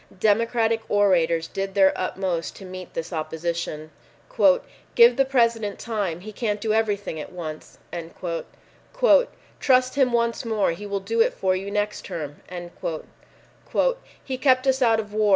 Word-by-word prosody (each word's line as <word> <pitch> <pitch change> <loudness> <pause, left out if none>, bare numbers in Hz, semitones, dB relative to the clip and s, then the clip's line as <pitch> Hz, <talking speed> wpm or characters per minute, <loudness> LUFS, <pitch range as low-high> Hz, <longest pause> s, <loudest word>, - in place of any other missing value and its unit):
Democratic 225 +2 +2
orators 170 -5 +3
did 195 +2 -4
their 190 -1 +5
utmost 185 -2 -2
to 195 - -10
meet 185 -1 -9
this 165 +2 -4
opposition. 160 -1 -3 1.0
"Give 470 +1 +7
the 270 - +3
President 230 -5 +1
time. 200 -7 -3
He 215 +3 -8
can't 210 -1 -2
do 215 0 0
everything 205 -6 0
at 150 - -7
once." 160 -4 -8 1.8
"Trust 255 -1 +3
him 265 -3 +3
once 235 -1 +1
more; 220 -6 +1
he 205 +5 -6
will 200 -1 -2
do 225 +4 0
it - - +2
for 185 -1 +1
you 195 +2 -4
next 210 +1 -2
term." 150 -3 -6 1.9
"He 260 -1 -4
kept 260 -1 +3
us 265 0 +2
out 225 -3 +4
of 210 -1 -6
war. 215 -1 +2
205 Hz, 145 wpm, -24 LUFS, 180-230 Hz, 1.9 s, Give